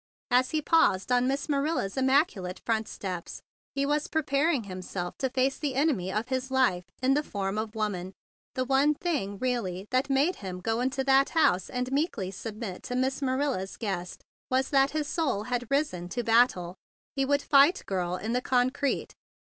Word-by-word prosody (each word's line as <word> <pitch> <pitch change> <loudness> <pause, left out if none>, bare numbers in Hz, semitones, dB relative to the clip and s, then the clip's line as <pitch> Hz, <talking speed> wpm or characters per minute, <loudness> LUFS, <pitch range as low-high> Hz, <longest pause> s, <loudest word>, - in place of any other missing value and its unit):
As 255 +1 +4
he 310 -1 -1
paused 250 - +3
on 250 0 +3
Miss 275 +1 -1
Manila's 285 -8 0
immaculate 265 - +1
front 225 -1 0
steps, 180 -3 -6 0.3
he 280 0 +1
was 295 +1 0
prepar¬ 310 0 +1
ing 270 -8 0
himself 185 -2 -5
to 265 - 0
face 265 +1 0
the 285 -4 -2
enemy 265 - +1
of 215 +5 -2
his 260 0 -2
life 250 -10 +2 0.2
in 265 +1 +4
the 295 - +2
form 200 -6 -3
of 220 0 -4
woman. 195 -4 -3 0.4
The 255 - 0
one 275 +3 +3
thing 270 - -2
really 195 -7 -2
that 255 +3 +1
made 280 +7 +2
him 185 -2 -6
go 225 +5 -1
into 265 +1 0
that 270 0 +4
house 185 - +3
and 250 +1 -3
meekly 270 - -1
submit 210 -1 -6
to 250 - -5
be 255 - +2
Miss 265 +2 -1
Manila's 260 -7 -1
guest 185 -5 -4 0.3
was 260 +1 +1
that 275 -1 +4
his 300 0 -2
soul 300 - -1
had 245 0 -3
risen 275 - -1
to 240 +5 -2
bat¬ 230 +2 +6
tle. 175 -1 -7 0.4
He 270 - +1
would 285 +1 +1
fight 290 +6 +5
Girl 180 -2 -1
in 220 +5 -3
the 250 - +1
con¬ 250 0 +2
crete! 285 -1 -2
255 Hz, 190 wpm, -28 LUFS, 195-275 Hz, 0.4 s, bat¬